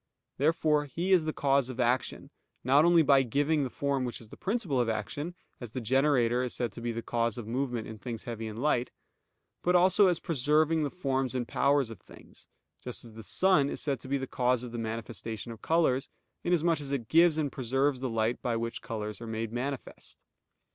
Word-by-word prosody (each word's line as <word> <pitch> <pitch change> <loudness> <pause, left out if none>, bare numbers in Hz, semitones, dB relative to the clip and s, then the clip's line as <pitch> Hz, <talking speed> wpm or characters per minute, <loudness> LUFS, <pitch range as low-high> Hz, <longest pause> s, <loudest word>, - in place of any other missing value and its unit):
Therefore 150 0 +2
He 170 +7 -3
is 175 -4 +4
the 155 - 0
cause 140 -3 +1
of 130 0 -7
action 125 +1 0 0.3
not 140 +5 +5
only 170 -1 +6
by 140 -2 +5
giving 145 +4 +1
the 130 - -2
form 140 0 -1
which 120 -2 -4
is 115 - -13
the - - -11
principle 195 - -1
of 120 -2 +1
action, 145 - -3 0.2
as 120 -3 -8
the 130 - -2
generator 125 0 +2
is 125 -1 -3
said 120 -3 -2
to 115 - -9
be 120 0 -2
the 115 0 -5
cause 115 -1 -1
of 120 - -5
movement 120 0 -2
in 110 -1 -9
things 115 +1 -6
heavy 115 -2 -5
and 110 0 -7
light; 125 -3 +1 0.7
but 180 +1 +2
also 185 +3 +5
as 175 -3 +1
preserving 155 +2 +2
the 145 - 0
forms 135 -6 -2
and 120 -2 -2
powers 140 -4 +2
of 110 - -10
things; - - -16 0.4
just 125 -1 -5
as 115 - -12
the 110 - -9
sun 155 - +3
is - - -4
said 140 -2 -1
to - - -11
be 140 +1 0
the 135 - -3
cause 125 -1 0
of 125 - -7
the 120 - -5
manifestation 115 0 -5
of 115 - -10
colors, 155 -6 +1 0.3
inasmuch 170 -2 +2
as 140 -1 -5
it 130 -6 -2
gives 165 +2 +5
and 150 -3 0
preserves 135 +2 0
the 130 0 -2
light 115 +1 0
by 120 -2 -1
which 115 0 -3
colors 105 0 -5
are 115 - -6
made 110 0 -4
manifest. 130 +2 -5
130 Hz, 215 wpm, -29 LUFS, 115-150 Hz, 0.7 s, only